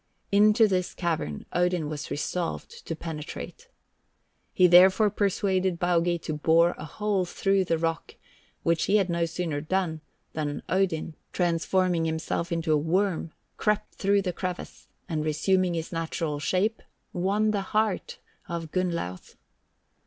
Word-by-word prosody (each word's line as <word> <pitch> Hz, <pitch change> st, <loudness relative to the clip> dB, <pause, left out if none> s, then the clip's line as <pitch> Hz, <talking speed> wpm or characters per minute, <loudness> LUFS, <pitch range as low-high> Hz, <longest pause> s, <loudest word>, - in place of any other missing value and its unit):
Into 215 Hz, +2 st, +5 dB
this 185 Hz, -3 st, -1 dB
cavern 160 Hz, -, -2 dB
Odin 175 Hz, -3 st, +1 dB
was 150 Hz, 0 st, -5 dB
resolved 170 Hz, +4 st, -4 dB
to 165 Hz, -, -2 dB
penetrate. 155 Hz, -2 st, -7 dB, 0.8 s
He 185 Hz, -, +4 dB
therefore 190 Hz, +4 st, +6 dB
persuaded 190 Hz, -3 st, 0 dB
Baugi 175 Hz, -1 st, +2 dB
to 155 Hz, -, -3 dB
bore 165 Hz, +3 st, +4 dB
a 150 Hz, -, -6 dB
hole 205 Hz, +4 st, -1 dB
through 195 Hz, +2 st, +1 dB
the 165 Hz, -, +1 dB
rock, 165 Hz, 0 st, -2 dB, 0.5 s
which 165 Hz, -1 st, +2 dB
he 200 Hz, -, +2 dB
had 190 Hz, -3 st, +1 dB
no 170 Hz, 0 st, +1 dB
sooner 165 Hz, -3 st, -3 dB
done 165 Hz, -1 st, -1 dB, 0.3 s
than 150 Hz, -2 st, -3 dB
Odin, 180 Hz, -4 st, 0 dB, 0.2 s
transforming 175 Hz, 0 st, +1 dB
himself 160 Hz, +1 st, -2 dB
into 165 Hz, -1 st, +1 dB
a -, -, +4 dB
worm, 170 Hz, +2 st, 0 dB, 0.3 s
crept 210 Hz, -1 st, 0 dB
through 200 Hz, 0 st, +2 dB
the 180 Hz, -2 st, -2 dB
crevice, 180 Hz, 0 st, -6 dB, 0.2 s
and 155 Hz, -2 st, -2 dB
resuming 175 Hz, +4 st, +1 dB
his 165 Hz, -1 st, -4 dB
natural 165 Hz, -2 st, -2 dB
shape, 190 Hz, +9 st, 0 dB, 0.3 s
won 205 Hz, +4 st, +1 dB
the 205 Hz, -2 st, 0 dB
heart 215 Hz, 0 st, -1 dB, 0.3 s
of 165 Hz, -2 st, -4 dB
Gunnlauth. 170 Hz, -, -3 dB
175 Hz, 140 wpm, -27 LUFS, 160-190 Hz, 0.8 s, therefore